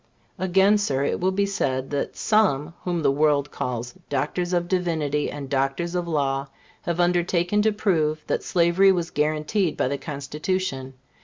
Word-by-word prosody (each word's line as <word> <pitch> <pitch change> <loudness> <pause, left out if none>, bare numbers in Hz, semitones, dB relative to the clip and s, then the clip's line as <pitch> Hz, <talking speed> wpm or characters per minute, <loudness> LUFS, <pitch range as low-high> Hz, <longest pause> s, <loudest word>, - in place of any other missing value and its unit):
Again, 190 +3 +4
Sir, 140 -9 0
it - - -1
will 185 - +2
be 200 +1 +1
said 135 -10 -2
that 145 - -3
some 170 -8 +2
whom 175 -3 -1
the 140 - +4
world 145 0 +2
calls 120 -1 -4 0.2
Doctors 175 0 -1
of 175 -1 0
Divinity 160 -6 0
and 145 -2 -6
Doctors 135 +6 -1
of 175 -1 -2
Law 140 -3 0 0.3
have 170 0 -3
undertaken 175 +2 +2
to 220 +1 +3
prove 160 -7 0
that - - -1
slavery 175 +3 +4
was 175 -3 -1
guaranteed 155 +4 0
by - - +1
the 140 +1 -2
Constitution. 145 -1 -3
165 Hz, 160 wpm, -24 LUFS, 140-185 Hz, 0.3 s, Again